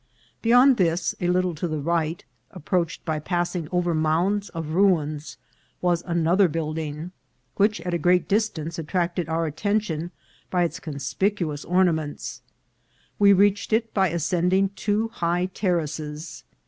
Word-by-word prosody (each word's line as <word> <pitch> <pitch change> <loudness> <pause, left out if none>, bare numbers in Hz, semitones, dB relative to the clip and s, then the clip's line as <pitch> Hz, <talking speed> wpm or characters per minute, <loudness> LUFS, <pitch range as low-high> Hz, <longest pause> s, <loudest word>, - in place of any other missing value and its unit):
Beyond 245 +3 +6
this, 170 -1 +1
a 175 - +1
little 180 0 +1
to 165 +3 -3
the 155 -1 -2
right, 165 +2 -1 0.2
approached 175 -1 -2
by 160 -2 -1
pass 175 +3 -1
ing 165 -4 -3
over 175 -1 +1
mounds 170 +6 +1
of 165 -2 -5
ruins, 155 -4 +1 0.4
was 175 -1 +1
another 170 +3 +3
building, 155 0 -4 0.5
which 210 +2 +3
at 180 - -3
a 170 - 0
great 180 +2 +3
distance 175 -7 -1
attracted 170 +1 -1
our 165 +1 0
attention 175 0 -1 0.4
by 180 -1 +2
its 170 - -2
conspic 165 +7 -1
uous 155 -5 -4
ornaments. 170 -5 0 0.8
We 200 -1 +7
reached 200 +2 +3
it 225 0 +1
by 190 -2 +3
ascending 180 +3 +1
two 210 +3 -1
high 175 -5 0
terraces. 155 -4 -3
175 Hz, 140 wpm, -24 LUFS, 160-190 Hz, 0.8 s, We